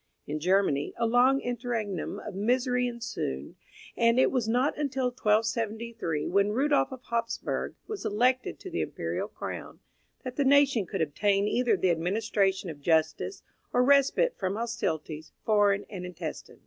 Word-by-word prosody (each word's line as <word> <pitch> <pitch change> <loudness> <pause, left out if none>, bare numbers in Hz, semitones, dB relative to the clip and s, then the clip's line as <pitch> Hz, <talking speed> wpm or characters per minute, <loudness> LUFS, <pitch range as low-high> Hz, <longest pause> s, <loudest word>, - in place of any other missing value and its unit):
In 150 +1 -3
Germany 180 -4 +1
a 235 - +1
long 250 +4 +4
interregnum 235 -7 -3
of - - -7
misery 250 +4 +1
ensued, 230 - -4 0.4
and 230 +1 +3
it - - +4
was 250 -4 0
not 250 +5 +2
until 270 -3 -1
1273, 225 -6 -1
when 200 +2 +2
Rudolph 280 +5 +2
of 260 -1 -9
Hapsburgh 230 0 -2
was 430 -2 -6
elected 250 +5 +1
to 375 - -8
the 345 - -1
imperial - - -3
crown, - - -7 0.4
that 255 -1 -6
the 285 - +3
nation 275 -7 +4
could 165 - -1
obtain 200 +6 +1
either 245 +2 +2
the 185 - +2
administration 195 +1 0
of 145 -2 -12
justice 160 - 0 0.3
or 250 - +3
respite 280 - +4
from 190 0 -1
hostilities, 165 -9 -3
foreign 205 -2 +3
and 185 -3 -7
intestine. 180 -1 -7
225 Hz, 150 wpm, -28 LUFS, 190-250 Hz, 0.4 s, long